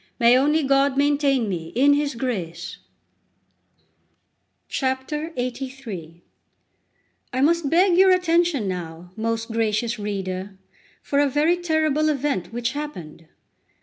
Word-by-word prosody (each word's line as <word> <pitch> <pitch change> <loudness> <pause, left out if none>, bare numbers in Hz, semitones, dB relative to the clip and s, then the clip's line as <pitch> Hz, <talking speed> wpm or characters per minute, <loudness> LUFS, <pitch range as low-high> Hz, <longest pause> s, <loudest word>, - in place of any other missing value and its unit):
May 235 0 +6
only 295 +4 +3
God 275 0 +2
maintain 280 -4 +2
me 170 -5 -4
in 280 +4 +5
His 285 -2 0
grace! 185 -9 -4 1.9
LXXXIII 260 - -4 1.1
I 255 - -1
MUST 325 0 +2
beg 355 +3 +4
your 380 +1 +6
attention 345 - +2
now, 175 -1 -6
most 225 +1 -2
gracious 225 +1 0
reader, 195 -1 -4 0.5
for 280 - 0
a 285 -1 +3
very 300 +6 +2
terrible 315 -3 +1
event 275 - -1
which 235 0 -2
happened. 180 - -7
260 Hz, 110 wpm, -23 LUFS, 210-295 Hz, 1.9 s, May